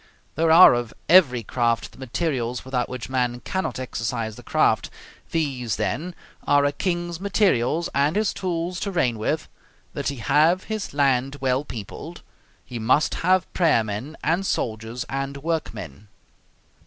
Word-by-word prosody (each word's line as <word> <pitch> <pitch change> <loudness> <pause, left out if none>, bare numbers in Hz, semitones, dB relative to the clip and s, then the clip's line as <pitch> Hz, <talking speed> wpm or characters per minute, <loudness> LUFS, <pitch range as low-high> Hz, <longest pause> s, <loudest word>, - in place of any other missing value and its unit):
There 165 +1 +1
are 165 -1 +9
of 120 -2 -3
every 140 -10 +5
craft 115 +1 0
the - - -18
materials 130 -3 -2
without 125 -2 -1
which 125 -1 -6
man 125 -2 -1
cannot 190 0 -3
exercise 115 -3 -3
the - - -11
craft. - - +1 0.4
These, 130 -8 -1
then, 145 - -3 0.3
are 145 0 +4
a 145 - +2
king's 175 +1 -2
materials 175 - +1
and 145 +4 +2
his 215 0 +1
tools 175 -1 -3
to 205 - -2
reign 125 - 0
with: 110 - -1 0.5
that - - -3
he 140 - -1
have 150 +9 +3
his 215 -2 -4
land 135 -1 +2
well 130 +1 +1
peopled; 110 -9 -8 0.4
he 120 - -6
must 125 +7 +2
have 185 +1 +3
prayer 160 -10 +3
men, 110 +9 -5
and 170 +5 +1
soldiers, 115 - -2
and 135 +1 -3
workmen. 110 - -4
135 Hz, 150 wpm, -24 LUFS, 120-170 Hz, 0.5 s, are